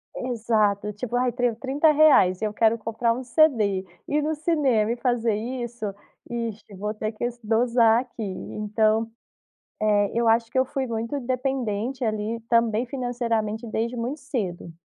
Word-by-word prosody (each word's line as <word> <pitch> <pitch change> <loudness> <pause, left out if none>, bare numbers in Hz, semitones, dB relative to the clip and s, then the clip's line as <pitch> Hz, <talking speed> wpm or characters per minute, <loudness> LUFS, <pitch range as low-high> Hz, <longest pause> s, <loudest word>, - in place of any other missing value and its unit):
Exato, 215 -4 0
tipo: 240 +3 -4
"Ai 250 0 +2
tenho 245 -2 0
R$30,00, 275 - +4
eu 210 -1 -1
quero 225 +1 +3
comprar 230 +1 0
um 255 +2 -5
CD, 230 -8 +2 0.2
ir 295 +1 +1
no 315 - 0
cinema 275 -9 +1
e - - 0
fazer 235 -3 +1
isso, 240 0 -4 0.4
ixe, 230 -3 -5
vou 210 +3 -3
ter 215 0 -3
que 215 - -8
s 240 0 -4
dosar 230 +1 +3
aqui." 240 -3 -8
Então, 215 +3 0 0.7
eh, 205 -1 +2
eu 235 0 +1
acho 230 0 +3
que 260 - +1
eu 260 - +3
fui 265 -1 -3
muito 230 +4 -3
independente 255 -2 -2
ali, 215 0 -1
também 230 0 +2
financeiramente, 235 -3 -2
desde 230 +3 -2
muito 250 +6 -3
cedo. 195 - -4
230 Hz, 155 wpm, -25 LUFS, 215-250 Hz, 0.7 s, R$30,00